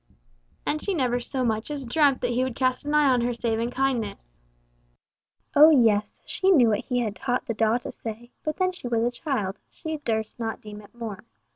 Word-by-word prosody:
And 305 0 -1
she 395 - -1
never 250 -5 +1
so 255 +1 -2
much 220 +1 -1
as 285 -3 -4
dreamt 275 +2 +3
that 245 - 0
he 250 +2 +1
would 260 -2 -3
cast 255 +1 0
an 295 - +1
eye 300 -1 +5
on 250 -2 +3
her 240 0 0
save 230 -1 -1
in 235 +1 -1
kindness. 250 - -1 1.3
Oh 300 +2 +9
yes, 220 -8 +3
she 380 - +1
knew 265 -11 +6
what 210 -1 0
he 250 -1 0
had 215 -3 -2
taught 250 0 -2
the 230 - -2
daw 225 +1 +2
to 245 - -7
say, 230 +2 -8
but 305 0 -2
then 370 -1 +2
she 360 -9 -7
was 230 -1 +1
a 240 - +1
child, 240 -7 -3
she 315 -2 -5
durst 220 -5 -3
not 225 -1 -3
deem 210 0 -10
it 205 +3 -18
more. 225 -4 -6
245 Hz, 220 wpm, -25 LUFS, 225-275 Hz, 1.3 s, Oh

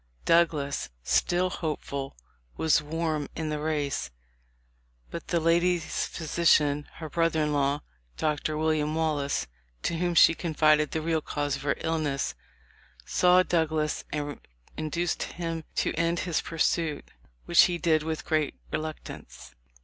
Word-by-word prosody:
Douglas, 150 - +2
still 180 - +2
hopeful, 140 - -4 0.4
was 160 -2 +3
warm 155 -1 -2
in 160 -1 -3
the 150 0 -2
race, 150 -2 -1 1.0
but - - -6
the 170 - +1
lady's 170 +1 +1
physician, 150 -3 +2
— - - -23
her 160 - -6
brother 165 0 +1
in 150 0 0
law, 140 0 +1 0.2
— - - -37
Dr. 150 0 -1
William 155 -1 +1
Wallace, 150 - 0 0.4
to 165 - -1
whom 175 -1 0
she 165 - +8
confided 155 -2 +2
the 160 - -3
real 160 -1 +1
cause 145 -2 -2
of 140 - -7
her 140 0 0
illness, 150 - -1 0.7
saw 180 0 +4
Douglas 160 -3 0
and 145 -1 -3 0.4
induced 170 +3 -2
him 165 -2 -4
to - - +1
end 170 +1 0
his 175 -4 0
pursuit,* 165 -2 -1 0.3
which 170 - +7
he 175 -2 -1
did 160 -3 +2
with 160 0 -4
great 155 -3 0 0.2
reluctance. 155 - -6
155 Hz, 140 wpm, -27 LUFS, 150-165 Hz, 1.0 s, she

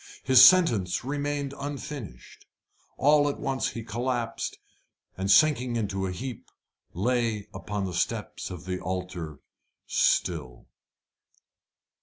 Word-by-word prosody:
His 130 -1 +7
sentence 120 - +5
remained 145 0 -2
unfinished. 140 - -7 0.5
All 145 +1 +4
at 140 - -5
once 135 -1 -1
he 115 - -7
collapsed, 120 +1 -3 0.6
and, 95 +1 -3
sinking 130 0 +4
into 100 -4 -2
a - - -3
heap, 120 +6 -7 0.4
lay 115 +1 -1
upon 105 -2 -4
the 90 - -5
steps 85 - -2
of 90 -4 -8
the 90 0 -3
altar 90 -5 -5 0.4
still. - - 0
115 Hz, 110 wpm, -27 LUFS, 95-135 Hz, 0.6 s, His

